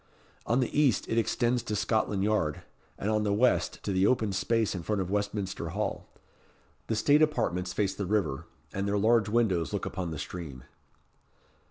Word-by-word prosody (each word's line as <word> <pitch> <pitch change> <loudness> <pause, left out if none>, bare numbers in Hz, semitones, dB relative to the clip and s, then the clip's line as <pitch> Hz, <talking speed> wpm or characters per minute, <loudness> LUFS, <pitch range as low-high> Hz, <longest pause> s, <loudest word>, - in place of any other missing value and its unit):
On 120 +3 +2
the 125 - -2
east 140 -7 +3
it 115 - +2
extends 120 +2 +1
to 105 - -3
Scotland 105 -2 0
Yard, 100 -8 0 0.3
and 105 - -1
on 105 0 +2
the 105 -1 0
west 120 +5 +1
to 100 - -2
the 95 +1 +3
open 110 -6 +1
space 115 +3 +1
in 90 - -4
front 105 +4 -1
of 95 -1 -2
Westminster 100 -1 -2
Hall. - - -3 0.8
The 110 - 0
state 145 +8 +4
apartments 90 - +1
face 100 -2 0
the 100 - -4
river, 90 -10 -1 0.3
and 100 +1 -2
their 100 +1 +1
large 110 +1 +3
windows 100 -9 +1
look - - -2
upon 95 -3 -4
the 80 - -5
stream. 75 -4 -7
105 Hz, 180 wpm, -29 LUFS, 95-115 Hz, 0.8 s, state